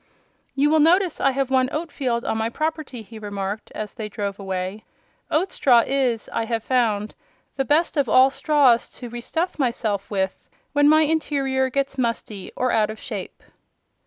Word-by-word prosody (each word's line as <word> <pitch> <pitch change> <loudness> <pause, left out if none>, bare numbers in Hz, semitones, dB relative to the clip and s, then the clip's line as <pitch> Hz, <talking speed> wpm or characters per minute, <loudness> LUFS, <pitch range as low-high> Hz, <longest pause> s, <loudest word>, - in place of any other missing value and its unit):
"You 290 +2 +3
will 315 - +4
notice 350 +3 +3
I 275 - +4
have 270 0 -1
one 260 -1 +3
oat 315 +1 -3
field 240 -3 -2
on - - 0
my 220 +1 0
property," 310 -4 -3
he 220 +1 -11
remarked, 200 0 -5
as 210 -2 -5
they 215 -1 -6
drove 200 -1 -4
away. 190 +1 -4 0.5
"Oat 360 +5 +1
straw 240 -4 +4
is, 260 -5 0
I 225 - 0
have 225 -1 -2
found, 220 -5 0 0.4
the 270 - -1
best 315 +5 +2
of 275 -5 +2
all 260 +4 +6
straws 280 -6 +3
to 245 - -7
re 240 +1 -6
stuff 330 +7 -2
myself 225 -6 -1
with 190 -2 -3 0.2
when 290 0 +5
my 310 +1 +6
interior 275 -4 0
gets 275 0 -2
musty 230 -4 -3
or 255 0 0
out 215 -1 +2
of 215 0 -7
shape." - - -7
255 Hz, 180 wpm, -23 LUFS, 215-290 Hz, 0.5 s, all